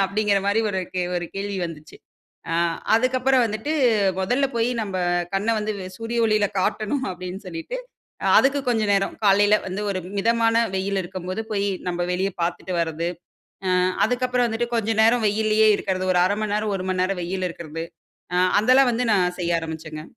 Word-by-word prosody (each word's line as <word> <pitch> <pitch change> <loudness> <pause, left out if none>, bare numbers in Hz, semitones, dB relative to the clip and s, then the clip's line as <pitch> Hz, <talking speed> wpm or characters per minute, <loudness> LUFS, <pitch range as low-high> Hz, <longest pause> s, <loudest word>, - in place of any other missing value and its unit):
அப்படின்கிற 205 0 +1
மாதிரி 205 +3 +2
ஒரு 190 -1 -1
கே 180 - 0
ஒரு 175 -1 -3
கேள்வி 200 0 -3
வந்துச்சு, 155 -1 -11 0.5
ஆ 165 - 0 0.4
அதற்கு 255 +3 +2
அப்புறம் 260 -1 +3
வந்துட்டு, 220 +8 -3 0.5
முதல்ல 250 +8 +1
போய் 230 +2 +1
நம்ம 195 -3 -4 0.4
கண்ணை 210 +4 +1
வந்து 215 0 -2 0.3
சூரிய 230 +1 -3
ஒளியில 210 -2 +2
காட்டணும் 215 +8 -1
அப்படினு 180 +2 -7
சொல்லிட்டு, 330 +10 -5 0.6
அதுக்கு 280 +1 +3
கொஞ்சம் 220 -4 +1
நேரம், 195 0 0
காலையில 205 +1 +5
வந்து 190 +2 -4
ஒரு 185 - -2 0.2
மிதமான 230 +1 +2 0.2
வெயில் 195 +1 -1
இருக்கும்போது 185 +3 -5
போய் 200 0 0 0.2
நம்ம 175 0 -1
வெளியே 190 +2 -1
பார்த்துட்டு 175 +2 -2
வரது. 165 +1 -2 0.6
ஆ - - +1 0.4
அதுக்கப்புறம் 250 0 +1
வந்துட்டு 225 +2 -1
கொஞ்ச 225 0 0
நேரம் 230 0 +4
வெயிலேயே 215 +1 +2
இருக்கிறது 185 -1 -2
ஒரு - - +4
1/2 205 - 0
மணி 210 -1 -2
நேரம், 210 -1 -1
1 185 - -5
மணி 185 - -1
நேரம் 190 0 -1
வெயில்ல 185 +1 -2
இருக்கிறது. 165 -1 -7 0.5
அ - - +2 0.2
அதெல்லாம் 255 +4 +5
வந்து 245 +2 0
நான் 180 -2 +1
செய்ய 170 0 0
ஆரம்பிச்சேங்க. 160 -1 -7
205 Hz, 170 wpm, -23 LUFS, 185-225 Hz, 0.6 s, காலையில